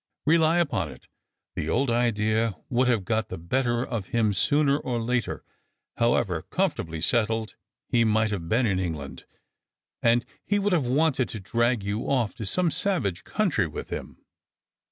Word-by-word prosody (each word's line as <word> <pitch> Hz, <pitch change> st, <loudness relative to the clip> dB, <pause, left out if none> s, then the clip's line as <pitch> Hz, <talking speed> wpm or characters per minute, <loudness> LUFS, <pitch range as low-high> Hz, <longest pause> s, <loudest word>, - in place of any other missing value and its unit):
Rely 160 Hz, +2 st, +4 dB
upon 140 Hz, -, 0 dB
it, -, -, -14 dB, 0.5 s
the 80 Hz, -, -3 dB
old 130 Hz, +7 st, +1 dB
idea 110 Hz, -3 st, +1 dB
would 125 Hz, +1 st, +2 dB
have 115 Hz, -6 st, +1 dB
got 110 Hz, 0 st, 0 dB
the -, -, -5 dB
better 120 Hz, +7 st, 0 dB
of 110 Hz, -6 st, -4 dB
him 110 Hz, -3 st, +1 dB
sooner 140 Hz, +7 st, +2 dB
or 120 Hz, -4 st, -2 dB
later, 120 Hz, 0 st, -1 dB, 0.5 s
however 110 Hz, -8 st, +1 dB
comfortably 85 Hz, -, -2 dB
settled 110 Hz, +1 st, +1 dB, 0.3 s
he 120 Hz, -1 st, +3 dB
might 110 Hz, 0 st, +2 dB
have 85 Hz, -5 st, -4 dB
been 120 Hz, +3 st, +3 dB
in 95 Hz, -4 st, +1 dB
England; 80 Hz, -6 st, -5 dB, 0.8 s
and 115 Hz, +1 st, +3 dB, 0.2 s
he 205 Hz, -, +1 dB
would 205 Hz, -1 st, +1 dB
have 150 Hz, -8 st, +2 dB
wanted 135 Hz, -1 st, +2 dB
to 110 Hz, -, -5 dB
drag 115 Hz, +3 st, 0 dB
you 100 Hz, +3 st, -2 dB
off 125 Hz, -6 st, +1 dB
to 110 Hz, -, -6 dB
some 175 Hz, -, +1 dB
savage 135 Hz, -, 0 dB
country 175 Hz, -, +1 dB
with 75 Hz, -, -7 dB
him." -, -, -6 dB
115 Hz, 160 wpm, -26 LUFS, 105-135 Hz, 0.8 s, Rely